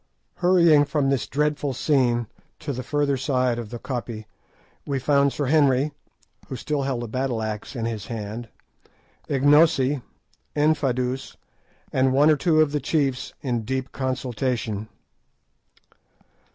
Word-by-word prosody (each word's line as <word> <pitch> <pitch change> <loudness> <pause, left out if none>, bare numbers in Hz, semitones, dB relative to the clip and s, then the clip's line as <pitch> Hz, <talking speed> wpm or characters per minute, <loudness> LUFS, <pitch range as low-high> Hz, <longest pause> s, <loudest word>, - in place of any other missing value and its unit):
Hurrying 170 -5 +5
from 140 -1 0
this 135 - 0
dreadful 145 -1 0
scene 125 -4 +2 0.3
to 145 - -4
the 130 - -4
further 145 +1 0
side 125 -3 0
of 115 -3 -6
the 120 - -6
koppie, 120 -3 -5 0.6
we 140 -1 -2
found 140 +1 +3
Sir 140 +4 -2
Henry, 140 0 +3 0.6
who 135 - -5
still 145 +4 -2
held 135 -3 -2
a - - -5
battle 125 -1 -2
axe 110 +4 -5
in 115 -2 -2
his 110 -3 -4
hand, 110 0 -6 0.8
Ignosi, 145 -1 +4 0.5
Infadoos, 135 -4 0 0.6
and 130 0 +3
one 145 +3 +5
or - - +5
two 155 +1 +3
of 155 -2 +2
the 150 - 0
chiefs 135 -3 -1
in 120 -4 -1
deep 130 +3 -3
consultation. 125 -5 -2
135 Hz, 135 wpm, -24 LUFS, 120-145 Hz, 0.8 s, Hurrying